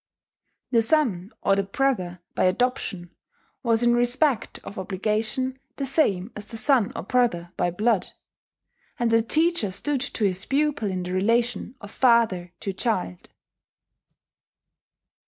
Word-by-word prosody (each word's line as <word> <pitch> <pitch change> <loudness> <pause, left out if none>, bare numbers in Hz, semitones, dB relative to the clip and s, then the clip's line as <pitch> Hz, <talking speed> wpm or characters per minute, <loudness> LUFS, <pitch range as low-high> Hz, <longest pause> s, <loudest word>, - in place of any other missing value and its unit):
The 230 -2 +4
son 225 - +1
or 195 - +3
the 200 - +2
brother 195 -5 -1
by - - +1
adoption 185 -4 -1 0.5
was 230 -2 +1
in 240 0 +4
respect 245 +2 +1
of 200 - -8
obligation 220 +7 -2 0.2
the 275 - -3
same 240 - +1
as 210 - -5
the 225 - -2
son 250 -4 +4
or - - -4
brother 190 -7 0
by 175 - 0
blood; 210 +3 +1 0.9
and 240 -3 0
the 230 0 +5
teacher 315 - +1
stood 275 +8 -2
to 250 -5 -1
his 190 -1 -1
pupil 285 -6 0
in 185 -1 -3
the 180 +1 -4
relation 230 +5 0
of 205 -1 -10
father 225 -9 +2
to 195 - -3
child. 185 - -2
225 Hz, 135 wpm, -24 LUFS, 190-255 Hz, 0.9 s, the